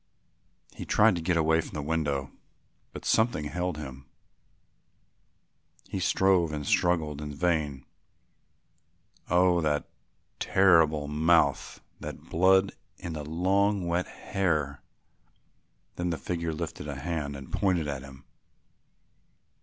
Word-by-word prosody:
He - - -7
tried - - +4
to - - -4
get 85 +1 +1
away 80 0 +3
from - - -10
the 75 - -2
window, 70 -3 -1 0.6
but - - -9
something 110 -9 +2
held 90 +2 -3
him. 65 -3 -9 1.8
He 95 - -3
strove 90 -2 +2
and 75 -1 -4
struggled 80 -4 +1
in 75 0 -5
vain. 75 -4 -1 1.4
"Oh, 90 0 +4
that 75 -2 0 0.5
terrible 80 -6 +4
mouth, 75 -1 +2 0.2
that - - -9
blood 95 +3 +4 0.3
in 85 - -6
the 75 -1 -5
long 95 +5 +1
wet 85 +1 0
hair." 75 -7 -2 1.2
Then 90 0 -1
the 85 - -1
figure 85 +3 -3
lifted 80 -1 -5
a 70 - -4
hand 75 -1 -3
and 70 -1 -10
pointed 90 -6 +1
at 70 -2 -4
him. 65 0 -13
80 Hz, 120 wpm, -28 LUFS, 75-90 Hz, 1.8 s, tried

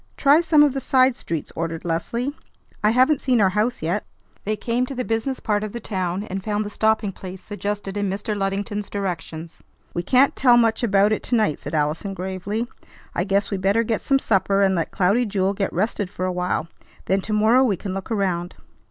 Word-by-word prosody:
"Try 290 +3 +5
some 310 -3 +5
of 290 -3 +3
the 270 - -3
side 260 0 +3
streets," 165 -8 -5
ordered 165 0 -4
Leslie; 235 - -2 0.5
"I 210 - +5
haven't 255 +5 +3
seen 250 -3 +2
our 195 -3 +4
house 215 0 0
yet." 180 +6 0 0.4
They 215 +1 0
came 235 +3 -1
to 275 - -6
the 250 0 -2
business 225 +4 -1
part 210 -2 0
of 215 - -5
the 235 - -4
town, 185 -3 -2
and 195 -2 -5
found 210 0 -1
the 205 - -6
stopping 220 -1 +1
place 185 0 -9
suggested 205 -1 -4
in 205 -1 -1
Mr. 205 +3 -3
Luddington's 200 +1 -2
directions. 170 -4 -5 0.3
"We 175 - -1
can't 255 +9 +3
tell 245 -2 +5
much 225 -1 +3
about 205 -2 +3
it 215 - 0
to 245 - -1
night," 215 -10 +1
said - - -5
Allison 155 +6 -1
gravely. 190 +4 -3 0.5
"I 175 - 0
guess 200 +2 0
we 200 - 0
better 200 +4 +2
get 225 -1 -1
some 275 - +3
supper 195 -4 +2
and 190 -1 +3
let 165 -3 -1
Cloudy 200 +7 +2
Jewel 195 -3 0
get 195 -1 -2
rested 200 +1 -1
for 185 -2 -4
a 185 - -1
while. 180 -2 -1 0.4
Then 195 +1 +1
to 215 - -3
morrow 220 +5 +4
we 210 -8 +1
can 195 0 -5
look 195 -1 -5
around." 185 -5 -1
205 Hz, 215 wpm, -23 LUFS, 190-230 Hz, 0.5 s, Try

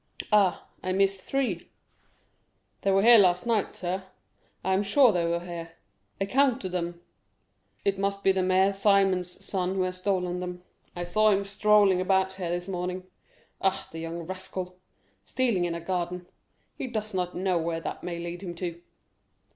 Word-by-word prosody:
Ah, 200 -4 +3
I 185 - -2
miss 195 0 +2
three, 235 -8 -2 1.1
they 195 - +1
were 195 0 +4
here 235 0 +9
last 180 -1 +3
night, 225 -3 0
sir—I 190 +1 -6
am 190 - +3
sure 235 +5 +5
they 175 -3 0
were 170 0 0
here—I 170 +2 -8
counted 255 -2 +2
them. 175 -1 -3 0.9
It 195 -1 +1
must 200 0 -1
be 195 - +5
the 190 - 0
son - - 0
of - - -1 0.7
Mère 180 +2 -7
Simon 185 -1 -1
who 190 - +1
has 185 0 -3
stolen 180 -2 -1
them; 180 0 -6 0.3
I 175 - -3
saw 215 +5 +3
him 200 -1 +2
strolling 200 -2 +4
about 190 0 +2
here 185 -2 -4
this 175 +1 -3
morning. 180 0 -3 0.6
Ah, 190 0 0
the 165 - -7
young 165 +1 -5
rascal—stealing 185 +4 -4
in 170 -1 -2
a - - -4
garden—he 180 +7 -6
does 215 -3 -4
not 180 -1 -2
know 185 -1 +1
where 165 0 -2
that - - -5
may 175 -1 -4
lead 170 +1 -6
him 175 -3 -6
to." 170 -1 -5
185 Hz, 165 wpm, -27 LUFS, 175-195 Hz, 1.1 s, here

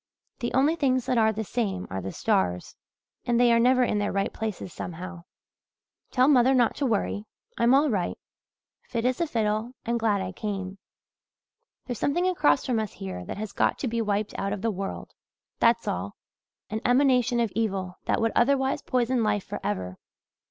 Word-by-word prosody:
The 240 -2 -2
only 285 +5 +4
things 260 -5 +1
that 250 -2 +1
are 220 0 +4
the 220 +1 -3
same 200 -4 -2
are 95 0 -3
the 95 +1 -5
stars 90 -1 0 0.5
and 240 -1 +2
they 240 -1 +5
are 230 - +4
never 250 +2 +4
in 210 -3 +1
their 205 - 0
right 195 0 -1
places, 210 -5 -5
somehow. 180 0 -7 0.8
"Tell 255 0 +3
mother 265 -2 +5
not 240 -3 +3
to 280 - 0
worry 210 -2 -1 0.3
I'm 235 +3 +5
all 290 +3 +4
right 200 -9 -1 0.7
fit 230 -1 -2
as 255 +5 +1
a 340 - +1
fiddle 220 -1 -1
and 235 +1 0
glad 215 -3 +2
I 190 -1 -3
came. 195 -1 -5 1.1
There's 245 -4 -5
something 350 +6 +1
across 315 -6 +2
from 245 -3 +1
us 215 -3 -3
here 90 -2 -6
that - - -6
has 210 -1 -5
got - - +1
to 265 - -3
be 230 0 -1
wiped 210 -1 -1
out 195 +1 -1
of 210 - -5
the 225 - +1
world, 195 0 -5 0.5
that's 230 0 +3
all - - -3 0.6
an 220 0 -2
emanation 250 -2 +3
of 230 -4 +1
evil 190 -5 -2
that - - +1
would 225 0 +1
otherwise 265 +2 +2
poison 250 -1 +1
life 205 -2 +1
for - - -6
ever. 95 -3 -3
225 Hz, 185 wpm, -26 LUFS, 195-250 Hz, 1.1 s, they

